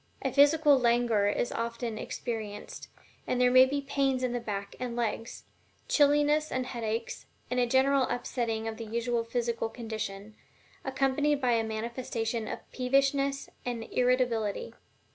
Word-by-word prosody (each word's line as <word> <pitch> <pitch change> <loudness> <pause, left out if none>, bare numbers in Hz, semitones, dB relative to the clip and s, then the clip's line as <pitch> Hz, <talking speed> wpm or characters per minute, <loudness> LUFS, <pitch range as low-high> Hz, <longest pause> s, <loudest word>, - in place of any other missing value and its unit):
A 265 - 0
physical 290 0 +5
languor 235 -4 +3
is 205 +4 0
often 230 -1 -3
experienced, 215 -3 -5 0.4
and 250 - 0
there 250 0 +4
may 255 +1 +8
be 285 +2 -1
pains 275 -2 0
in 250 -1 0
the 245 - -1
back 200 -3 -5
and 250 -2 -3
legs, 230 -1 -3 0.4
chilliness 295 +1 +3
and 255 -1 -1
headaches, 230 -2 -4 0.2
and 250 - +1
a 245 - +3
general 265 +2 +3
upsetting 230 -2 -2
of 220 -1 -4
the 230 - -6
usual 235 +1 -1
physical 230 -1 -2
condition, 220 -3 -6 0.5
accompanied 270 +2 +1
by 250 -3 +1
a 230 -1 +2
manifestation 225 0 -3
of - - -6
peevishness 275 +2 +1 0.2
and 240 -2 -3
irritability. 250 - +1
245 Hz, 145 wpm, -29 LUFS, 225-265 Hz, 0.5 s, may